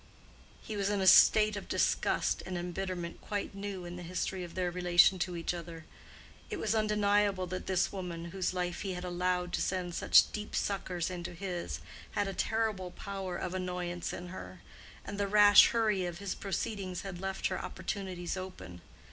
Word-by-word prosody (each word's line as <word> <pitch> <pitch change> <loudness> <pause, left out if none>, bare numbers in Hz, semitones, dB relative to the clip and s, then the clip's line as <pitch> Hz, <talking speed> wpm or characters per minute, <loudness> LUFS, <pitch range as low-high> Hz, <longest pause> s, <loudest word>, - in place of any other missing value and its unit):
He 220 - -5
was 200 -1 0
in 205 -1 0
a 190 - +1
state 215 +3 +7
of 200 - -6
disgust - - +1
and 185 -1 -3
embitterment 175 0 -4
quite 205 -1 -3
new 195 -2 -5
in 175 0 -7
the - - -7
history 180 +1 -3
of 175 - -9
their 180 -1 0
relation 180 +1 +5
to 180 0 -1
each 170 - -1
other. 165 -2 -8 0.6
It - - -3
was - - 0
undeniable 205 -3 +2
that 185 +1 -5
this 190 -1 +1
woman, 170 -3 -5
whose 190 0 -1
life 180 -1 -2
he 195 -1 -3
had 180 - -5
allowed 180 0 -1
to - - 0
send 180 -2 -1
such - - +5
deep 210 0 -5
suckers 185 -3 -1
into 175 -1 -6
his, 180 -1 -4 0.3
had 205 - 0
a 195 - -3
terrible 215 -4 -1
power 195 -1 -5
of 180 - -4
annoyance 180 -1 -3
in 175 0 -7
her; 185 - -9 0.4
and 205 - -6
the 200 - +1
rash 205 0 +8
hurry 215 -6 +1
of 175 -1 -5
his 195 0 -3
proceedings 195 -2 -3
had 190 -3 -7
left 195 0 -3
her - - -3
opportunities 185 -4 -4
open. 95 - -8
185 Hz, 180 wpm, -32 LUFS, 175-200 Hz, 0.6 s, rash